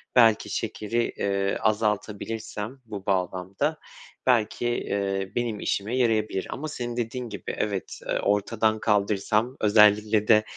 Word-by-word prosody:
belki 115 -3 +5
şekeri, 115 +1 -2
eee, 100 0 0
azaltabilirsem 110 +2 -2
bu 100 -3 -7
bağlamda 95 - -1 0.5
belki, 120 -1 +2
eee, 100 -5 -1
benim 120 -3 -1
işime 110 +6 -1
yarayabilir. 110 -5 +1
Ama 155 +4 -4
senin 120 -5 -5
dediğin 120 +1 -3
gibi 100 -2 -5
evet, 100 -3 -3
eee, - - 0
ortadan 110 +2 +1
kaldırsam, 105 +3 +1
özellikle 105 0 +4
de 110 -1 +6
110 Hz, 120 wpm, -26 LUFS, 100-115 Hz, 0.5 s, de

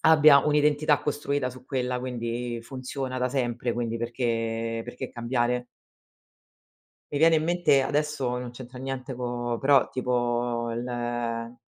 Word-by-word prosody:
abbia 155 -3 +7
un'identità 150 -1 +3
costruita 145 -2 -1
su 125 0 -11
quella, 125 -2 -1
quindi 120 -1 -3
funziona 130 +1 -5
da 125 0 +1
sempre, 120 -2 -1
quindi 115 -1 -2
perché 115 -1 -1
perché 120 0 -6
cambiare? 120 0 0 1.5
Mi 145 - 0
viene 165 +1 +6
in 155 - +1
mente 175 -5 +3
adesso 145 -3 0
non 125 -1 -5
c'entra 125 +1 -10
niente 135 0 -4
co 120 -1 -2
però 135 -1 +5
tipo 120 -1 0
le 120 0 -3
125 Hz, 130 wpm, -27 LUFS, 120-135 Hz, 1.5 s, abbia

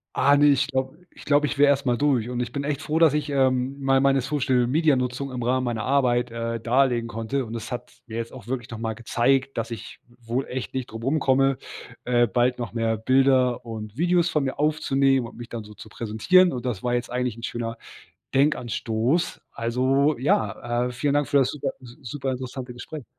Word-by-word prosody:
Ah, 140 +2 +4
ne. 145 +1 +5
Ich 140 -1 +3
glaube 130 +2 -3 0.2
ich - - -13
glaube 145 0 +3
ich 140 - -3
wäre 145 0 +5
erst 140 0 +2
mal 120 -1 +2
durch 130 -5 +1
und 125 0 -3
ich 120 - -2
bin 140 +2 -4
echt 145 0 -2
froh, 155 +1 0
dass 160 -3 +5
ich, 150 0 -1
ähm, 130 -1 +1
mal 135 -1 +3
meine 135 0 +3
Social-Media-Nutzung 130 0 +1
im 125 -1 -5
Rahmen 130 +2 +1
meiner 115 -3 -2
Arbeit, 125 -3 +2
äh, 115 0 -3
darlegen 120 0 +2
konnte, 115 +4 -2
und 110 - -8
das 115 0 -6
hat 125 - -6
mir 115 - -7
jetzt 115 0 -4
auch 110 - -11
wirklich 125 -3 -3
noch 115 - -6
mal 115 -1 -3
gezeigt, 130 +4 0
dass 115 +1 -3
ich 115 -4 -8 0.2
wohl 120 +3 -3
echt 130 0 -5
nicht 130 -2 -3
drum 115 +1 -8
rumkomme, 135 -2 +2 0.5
äh, 120 -1 +3
bald 125 +2 +1
noch 120 - -5
mehr 115 -1 0
Bilder 130 +1 +3
und 110 -1 -7
Videos 175 +1 +2
von 150 - +1
mir 135 - -3
aufzunehmen 135 -4 +2
und - - -14
mich 120 0 -9
dann 115 -2 -6
so 105 0 -13
zu 110 - -12
präsentieren, 120 - +3
und 125 0 -4
das 110 -7 -3
war 125 0 0
jetzt 120 0 -2
eigentlich 125 -2 -2
'n 115 - -10
schöner 115 -1 -4 0.6
Denkanstoß. 125 +2 0
Also 130 +4 +1
ja, 120 -1 0
äh, - - -6
vielen 140 +3 0
Dank 145 -1 +1
für 140 - +3
das 130 - +3
super 150 - -3
s 120 0 -13
super 135 +1 -3
interessante 130 0 -6
Gespräch. 140 +2 -8
125 Hz, 210 wpm, -24 LUFS, 120-140 Hz, 0.6 s, ne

